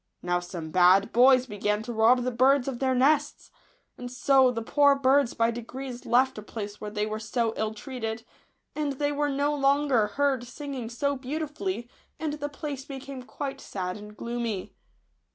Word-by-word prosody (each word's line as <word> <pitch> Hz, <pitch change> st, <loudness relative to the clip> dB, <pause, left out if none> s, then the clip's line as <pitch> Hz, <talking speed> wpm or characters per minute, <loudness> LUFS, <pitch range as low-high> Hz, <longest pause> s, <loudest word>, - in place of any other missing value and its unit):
Now 175 Hz, 0 st, +1 dB
some 175 Hz, -3 st, -7 dB
bad 185 Hz, +3 st, +5 dB
boys 255 Hz, +1 st, +6 dB
began 210 Hz, -1 st, -1 dB
to 240 Hz, -, -5 dB
rob 235 Hz, +3 st, +4 dB
the 255 Hz, -, -1 dB
birds 260 Hz, +2 st, +3 dB
of 255 Hz, -3 st, -3 dB
their 260 Hz, -1 st, +1 dB
nests; 295 Hz, +3 st, +1 dB, 0.5 s
and 245 Hz, 0 st, -6 dB
so 265 Hz, 0 st, +4 dB
the 230 Hz, -2 st, -3 dB
poor 285 Hz, +3 st, +4 dB
birds 275 Hz, -1 st, +3 dB
by 230 Hz, 0 st, +2 dB
degrees 245 Hz, +2 st, -7 dB
left 250 Hz, 0 st, +3 dB
a -, -, -7 dB
place 205 Hz, -1 st, -7 dB
where 210 Hz, -, -4 dB
they 210 Hz, 0 st, -2 dB
were 215 Hz, 0 st, -4 dB
so 225 Hz, +1 st, -1 dB
ill 220 Hz, 0 st, -1 dB
treated, 225 Hz, -2 st, -5 dB, 0.5 s
and 295 Hz, -2 st, -1 dB
they 290 Hz, +2 st, -1 dB
were 290 Hz, 0 st, 0 dB
no 285 Hz, +1 st, 0 dB
longer 275 Hz, -5 st, +2 dB
heard 265 Hz, +2 st, 0 dB
sinking 265 Hz, -3 st, -6 dB
so 280 Hz, +4 st, -1 dB
beautifully, 260 Hz, -6 st, -4 dB, 0.3 s
and 315 Hz, -2 st, -2 dB
the 290 Hz, -1 st, -4 dB
place 285 Hz, -2 st, -6 dB
became 270 Hz, -1 st, -8 dB
quite 270 Hz, +2 st, -6 dB
sad 180 Hz, -2 st, -4 dB
and 210 Hz, 0 st, -11 dB
gloomy. 235 Hz, -5 st, -4 dB
250 Hz, 175 wpm, -27 LUFS, 220-280 Hz, 0.5 s, boys